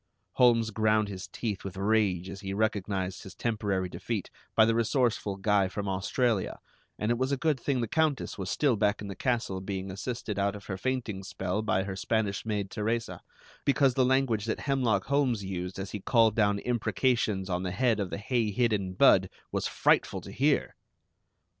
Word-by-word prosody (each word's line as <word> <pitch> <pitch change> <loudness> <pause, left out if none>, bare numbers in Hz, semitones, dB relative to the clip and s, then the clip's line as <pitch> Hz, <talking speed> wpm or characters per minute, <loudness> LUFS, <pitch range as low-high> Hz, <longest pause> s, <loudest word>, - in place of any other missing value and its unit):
Holmes 115 -3 +4
ground 110 0 +2
his 95 -1 -6
teeth 105 +1 -4
with 95 -1 -7
rage 100 -3 +1
as 95 +1 -8
he 95 -1 -4
recognized 100 -3 -1
his 95 - -11
temporary 105 -5 -1
defeat - - -4 0.2
by 110 - +7
the 115 - +2
resourceful 115 -3 +1
guy 100 -1 +2
from 100 +2 -4
Australia, 100 +3 0 0.4
and 105 +2 0
it 120 - 0
was 130 +1 0
a 140 - +1
good 150 0 +1
thing 130 0 0
the 115 - -1
Countess 155 +2 0
was 95 -2 -5
still 130 +5 +2
back 105 0 +1
in 100 - -6
the 100 - -5
castle 115 -6 -1
being 95 0 -4
assisted 105 +1 -4
out 100 +1 +1
of 100 - -10
her 95 - -4
fainting 115 -2 -2
spell 95 +1 -3
by 95 -3 +1
her 95 -1 -5
Spanish 105 0 -1
maid 105 -3 -2
Teresa, 115 +2 -2 0.4
because 140 -2 +3
the 130 - +3
language 125 -5 +2
that 110 - -2
Hemlock 125 -8 +1
Holmes 135 -6 +1
used 90 -1 -4
as 95 0 -5
he 105 - -4
called 115 +1 +3
down 105 -2 +3
imprecations 115 -3 0
on 90 -1 -1
the 95 - -2
head 110 +4 +1
of 100 -3 -2
the - - -4
hay 110 +1 0
hidden 105 -4 0
Budd 95 - +5 0.2
was - - -1
frightful - - +2
to - - -10
hear! - - +1
105 Hz, 190 wpm, -29 LUFS, 95-120 Hz, 0.4 s, by